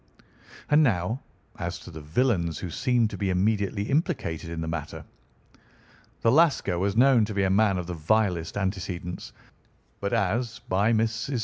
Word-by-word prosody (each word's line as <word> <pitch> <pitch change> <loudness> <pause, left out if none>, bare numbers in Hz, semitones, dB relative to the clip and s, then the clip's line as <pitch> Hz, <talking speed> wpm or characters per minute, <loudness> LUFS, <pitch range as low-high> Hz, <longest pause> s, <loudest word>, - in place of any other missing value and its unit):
"And 150 +1 +6
now 110 - +1 0.4
as - - -3
to - - -12
the 80 - -8
villains 85 - 0
who 90 - -5
seemed 125 - +1
to - - -7
be 100 -2 0
immediately 100 +2 +1
implicated 105 - -1
in 85 -1 -5
the 80 - -3
matter. 80 -2 -5 1.2
The 115 - +4
Lascar 140 - +3
was 100 +3 0
known 125 -2 +6
to 105 -1 -6
be 100 - +2
a 95 - +2
man 100 -1 +3
of 90 - -3
the 90 - -5
vilest 85 +1 0
antecedents, 95 -3 -4 0.7
but - - -2
as, 115 0 0
by 100 +4 +2
Mrs. 110 0 +3 0.2
St. 135 -3 -2
100 Hz, 170 wpm, -26 LUFS, 90-115 Hz, 1.2 s, And